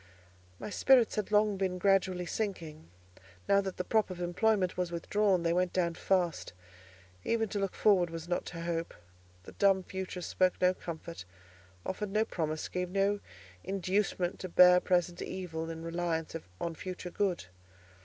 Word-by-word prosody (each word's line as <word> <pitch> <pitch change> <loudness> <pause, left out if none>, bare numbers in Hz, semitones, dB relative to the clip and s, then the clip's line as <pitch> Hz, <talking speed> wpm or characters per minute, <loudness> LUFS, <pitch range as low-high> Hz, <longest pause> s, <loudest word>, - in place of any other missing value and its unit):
My 210 - -7
spirits 250 +3 +4
had 210 -2 -2
long 210 -1 +3
been 185 -1 -1
gradually 185 -2 +2
sinking; 170 - -4 0.6
now 200 0 +5
that 190 -2 -5
the 180 - -1
prop 215 +2 +1
of 185 -1 -7
employment 185 +2 +1
was 180 -1 -2
withdrawn, 185 +2 +1
they 170 0 +2
went 180 0 +1
down 170 -2 +1
fast. 175 - 0 0.7
Even 225 -1 +1
to 205 - -2
look 195 -1 -2
forward 185 -5 +4
was 165 0 -7
not 175 - -1
to 170 -1 -7
hope: 170 0 -3 0.5
the - - -11
dumb 195 -2 +3
future 190 0 -5
spoke 185 +1 +1
no 180 0 +4
comfort, 170 - -7 0.6
offered 205 +2 -3
no 215 +2 +1
promise, 155 -5 -3
gave 180 0 -3
no 200 +2 +1 0.4
inducement 190 -1 -1
to 185 - -5
bear 180 +1 +7
present 175 -1 0
evil 165 -3 -5
in 165 0 -6
reliance 165 -1 -2 0.2
on 170 - -2
future 180 +1 -7
good. 185 - -1
180 Hz, 160 wpm, -31 LUFS, 170-195 Hz, 0.7 s, bear